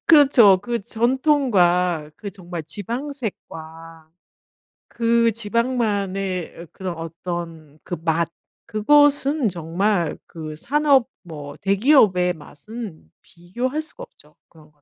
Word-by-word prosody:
그렇죠. 265 - +6
그 235 +3 -3
전통과 200 - +1
그 200 - -7
정말 175 -3 -8
지방색과 165 - -7 0.8
그 230 0 +2
지방만의 205 -5 -1
어 175 - -14
그런 185 -2 -6
어떤 165 -2 -7
그 175 - -4
맛 165 0 +1 0.4
그것은 285 +4 +4
정말 175 0 -1
그 155 -2 -8
산업 275 - +2 0.2
뭐 150 -4 -9
대기업의 195 -4 +3
맛은 185 +4 -10
비교할 240 - -4
수가 400 +10 -10
없죠 - - -18
그런 155 -2 -20
거. 145 -1 -38
195 Hz, 205 characters per minute, -21 LUFS, 165-240 Hz, 0.8 s, 그렇죠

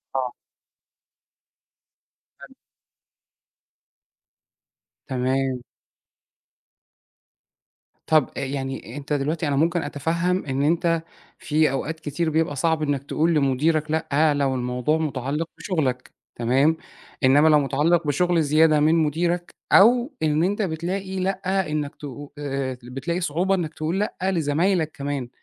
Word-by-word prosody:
آه. 130 -2 -1 2.1
حلو. - - -13 2.5
تمام. 130 0 -1 2.5
طب 155 -4 +3
أ - - -2
يعني 135 -2 -4
أنت 145 +1 -4
دلوقتي 150 +3 -1
أنا 140 - 0
ممكن 170 +4 +2
أتفهم 170 +5 -1
إن 135 0 -1
أنت 165 +1 +2 0.4
في 150 -1 +1
أوقات 160 +4 -3
كتير 160 +2 -2
بيبقى 160 -2 0
صعب 160 +2 +1
إنك 145 -2 -1
تقول 165 +4 +1
لمديرك 150 +2 +1
لأ، 155 -1 +2
لو 140 -2 0
الموضوع 125 +4 0
مُتعلّق 150 0 -2
بشغلك، 135 -10 -2 0.2
تمام، 135 +7 +2 0.5
إنما 145 +4 +5
لو 150 -1 +6
مُتعلّق 150 +4 +1
بشغل 170 +3 +2
زيادة 155 +1 +4
من 155 +2 +4
مديرك، 170 +3 0 0.2
أو 240 +6 +5
إن 155 +1 +2
أنت 205 +4 0
بتلاقي 190 +2 -3
لأ 190 -2 -1
إنك 150 -2 -2
ت - - -23 0.3
آآ 135 -3 -3
بتلاقي 135 +8 -4
صعوبة 180 +5 +1
إنك 165 -4 -3
تقول 160 +5 -2
لأ 210 - -2
لزمايلك 165 -1 +1
كمان، 140 -3 -4
155 Hz, 115 wpm, -23 LUFS, 140-170 Hz, 2.5 s, لو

